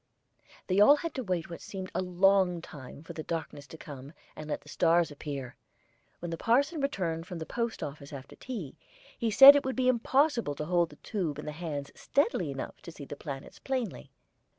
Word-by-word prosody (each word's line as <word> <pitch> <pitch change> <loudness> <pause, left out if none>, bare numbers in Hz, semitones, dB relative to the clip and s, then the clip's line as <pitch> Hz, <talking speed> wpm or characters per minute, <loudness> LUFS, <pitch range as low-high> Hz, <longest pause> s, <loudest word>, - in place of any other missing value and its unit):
They 185 +1 +1
all 245 +8 +8
had 330 +3 -4
to 260 - -3
wait 180 -6 -2
what 170 - -7
seemed 190 -1 -7
a - - 0
long 185 0 +3
time 145 -3 -11
for - - -9
the 155 - -5
darkness 155 -3 -5
to 160 - -11
come, 140 -1 -10 0.2
and 155 0 -8
let - - -2
the - - -20
stars 170 -1 +2
appear. 140 -3 -6 0.6
When 175 -1 -6
the 165 - -4
parson 280 +7 +2
returned 175 -11 -2
from 180 - -6
the 160 - -5
post 235 +3 -3
office 140 -1 -7
after 140 -2 -9
tea, 210 - -7 0.4
he 230 - -1
said 270 +6 +11
it 285 - +2
would 260 0 -2
be 255 -1 +1
impossible 255 - +2
to 150 - -4
hold 175 0 +2
the - - -14
tube 175 -9 -3
in - - -7
the 150 - -4
hands 150 -3 -5
steadily 235 - 0
enough 135 -1 -6
to 170 - -9
see 145 -3 -10
the 145 - -7
planets 140 -2 -8
plainly. 260 -4 -3
175 Hz, 205 wpm, -30 LUFS, 150-230 Hz, 0.6 s, said